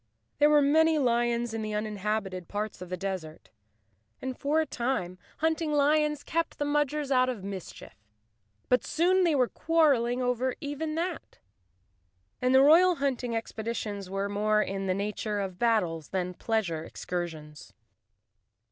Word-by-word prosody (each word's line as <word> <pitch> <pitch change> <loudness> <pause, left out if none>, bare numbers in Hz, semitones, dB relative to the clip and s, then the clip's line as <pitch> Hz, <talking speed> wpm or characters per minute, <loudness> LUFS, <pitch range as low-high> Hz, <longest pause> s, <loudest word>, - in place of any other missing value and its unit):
There 295 - +6
were 295 -1 +5
many 320 +3 +4
lions 240 -3 +1
in 225 - -3
the 215 -1 -3
uninhabited 210 -3 -3
parts 210 -1 -4
of 180 - -8
the 185 - -3
des¬ 190 -2 -3
ert, 155 0 -14 0.7
and 260 -1 -4
for 295 +5 0
a 320 - +1
time 235 - -2 0.2
hunting 320 0 0
lions 300 0 +2
kept 330 0 -2
the 290 - -1
Mudgers 295 0 0
out 255 -1 +4
of 230 -7 -5
mischief. 195 -2 -8 0.7
But 250 - +3
soon 365 +4 +2
they 335 -4 +3
were 255 -3 +3
quarreling 275 -8 +2
over 250 0 0
even 300 +2 -4
that, 345 +1 -4 1.0
and 255 +1 +3
the 265 - +7
royal 345 +5 +6
hunting 260 -5 -1
expeditions 220 -3 -4
were 195 +1 -2
more 210 +1 +1
in 195 -1 -2
the 185 - +1
nature 210 +1 -2
of 190 -2 -4
battles 180 -10 +1
than 180 -1 -2
pleasure 180 -6 -1
excursions. 160 -4 -6
235 Hz, 150 wpm, -28 LUFS, 195-290 Hz, 1.0 s, the